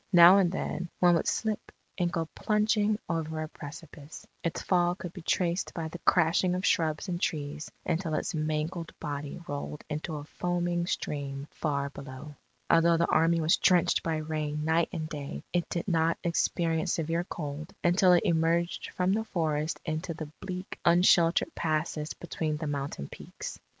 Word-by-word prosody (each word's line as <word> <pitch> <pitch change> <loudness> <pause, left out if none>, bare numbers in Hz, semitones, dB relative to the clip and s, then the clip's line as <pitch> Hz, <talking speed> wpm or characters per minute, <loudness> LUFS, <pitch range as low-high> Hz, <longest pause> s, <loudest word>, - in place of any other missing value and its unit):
Now 175 +3 +9
and 180 -3 +3
then, 180 -2 -3
one 175 -1 +6
would 165 - +1
slip 220 -2 -1 0.2
and 175 -2 0
go 165 -1 -1
plunging 210 0 +2
over 160 -1 -2
a - - -4
precipice; 150 0 -10 0.2
its 170 - -2
fall 175 -1 +2
could 180 -2 -7
be 185 - -8
traced 175 +2 0
by 160 -2 -3
the 175 - -8
crashing 175 +1 +3
of 185 - -2
shrubs 155 +1 +1
and 175 -1 -3
trees 150 0 -2 0.2
until 165 -2 0
its - - -2
mangled 155 +2 -2
body 145 +1 -4
rolled 145 +1 -5
into 155 +1 -3
a 145 - -5
foaming 175 +2 -1
stream 140 -4 -3
far 140 -2 -2
below. 140 +2 -9 0.3
Although 165 0 +5
the 170 - +1
Army 165 +1 +4
was 160 +1 +4
drenched 180 -3 +4
by 165 -1 -1
rain 155 -1 -2
night 160 +1 +2
and 160 -3 -3
day, 140 - -6
it 175 -1 0
did 170 - -3
not 165 -2 +2
experience 165 -1 +1
severe 165 +1 0
cold 155 -3 -6
until 180 +1 +5
it 175 - +4
emerged 170 +1 +1
from 185 +1 +1
the 220 +2 +1
forests 155 -5 -1
into 160 +1 -3
the 155 -2 -7
bleak 185 0 -6
unsheltered 170 - +4
passes 155 -1 -1
between 155 -3 -3
the 155 - -4
mountain 140 - -3
peaks. - - -8
165 Hz, 165 wpm, -29 LUFS, 155-175 Hz, 0.3 s, Now